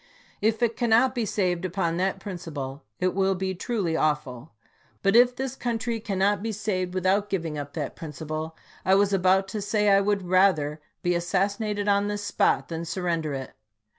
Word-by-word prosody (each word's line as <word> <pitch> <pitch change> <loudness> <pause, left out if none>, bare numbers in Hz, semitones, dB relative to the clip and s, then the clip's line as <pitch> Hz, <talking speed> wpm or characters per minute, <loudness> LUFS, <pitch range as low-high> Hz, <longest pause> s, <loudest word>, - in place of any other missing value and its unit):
If 220 +2 +1
it 230 -1 +2
cannot 240 +2 +3
be 235 -4 -1
saved 180 -3 0
upon 175 -2 -1
that 190 +1 0
principle, 155 -8 -6 0.2
it 185 0 +1
will 195 0 +2
be 190 +1 -2
truly 185 -3 -2
awful. 150 -4 -1 0.5
But 195 +1 +3
if 245 +1 +6
this 265 0 -3
country 235 -2 -2
cannot 200 -2 +1
be 225 +1 -2
saved 190 -4 -2
without 190 +3 +1
giving 165 -6 -2
up 145 -1 -6
that 150 -4 -4
principle, 155 +1 -6 0.3
I 190 - +4
was 200 0 +3
about 190 +1 +3
to 210 +2 -4
say 210 +1 +1
I 195 0 +6
would 200 -1 0
rather 175 -5 +2 0.2
be 175 - +2
assassinated 200 +4 0
on 200 0 +3
this 205 0 -3
spot 205 - +1
than 165 0 -4
sur 180 +2 -4
render 165 -4 -1
it. 130 -1 -6
190 Hz, 180 wpm, -26 LUFS, 170-205 Hz, 0.5 s, if